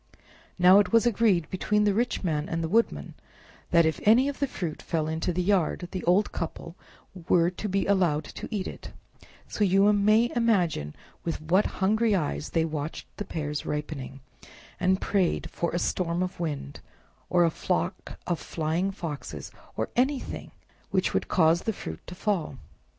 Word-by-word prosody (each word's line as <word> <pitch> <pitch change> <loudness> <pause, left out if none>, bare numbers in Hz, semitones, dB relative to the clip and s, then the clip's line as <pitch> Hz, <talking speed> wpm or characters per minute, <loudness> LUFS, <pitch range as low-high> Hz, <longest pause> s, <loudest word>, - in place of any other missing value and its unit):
Now 185 +2 +7
it 205 - +1
was 230 0 +4
agreed 210 -8 +2
between 210 +3 +1
the 205 -1 +3
rich 235 +2 0
man 155 -4 -1
and 165 0 -2
the - - -1
Woodman 225 +7 0 0.6
that 170 -1 +5
if 160 - 0
any 235 +6 +5
of 285 - -6
the 280 - +1
fruit 175 -10 -5
fell 160 -2 -1
into 160 +2 -1
the 180 +1 -1
yard, 180 -2 +1
the 185 -3 -4
old 185 +4 +3
couple 165 0 -5 0.5
were 170 0 +4
to 210 +3 -5
be 195 +1 0
allowed 175 -7 +2
to - - -8
eat 205 -4 -3
it; - - -9 0.6
so 210 - -1
you 195 +2 +4
may 215 +3 +3
imagine 180 - +1 0.3
with 165 - -2
what 175 +6 +2 0.2
hungry 220 +2 +3
eyes 80 - -2
they 165 -1 +1
watched 155 -1 -5
the 205 - -4
pears 150 -3 -3
ripening, 150 -3 -5 0.6
and 185 +1 +2
prayed 190 -4 0
for 170 - -1
a 175 - -1
storm 175 0 0
of 185 -1 -5
wind, 145 - -4 0.5
or 175 -1 +4
a 165 - +3
flock - - -2
of 175 -2 -1
flying 165 +4 -1
foxes, 165 -7 -6 0.3
or - - -1
anything 260 +2 -1 0.4
which - - 0
would - - 0
cause 165 -1 +3
the 225 - -2
fruit 80 - -7
to 180 - -8
fall. 180 -9 -1
180 Hz, 170 wpm, -27 LUFS, 160-205 Hz, 0.6 s, Now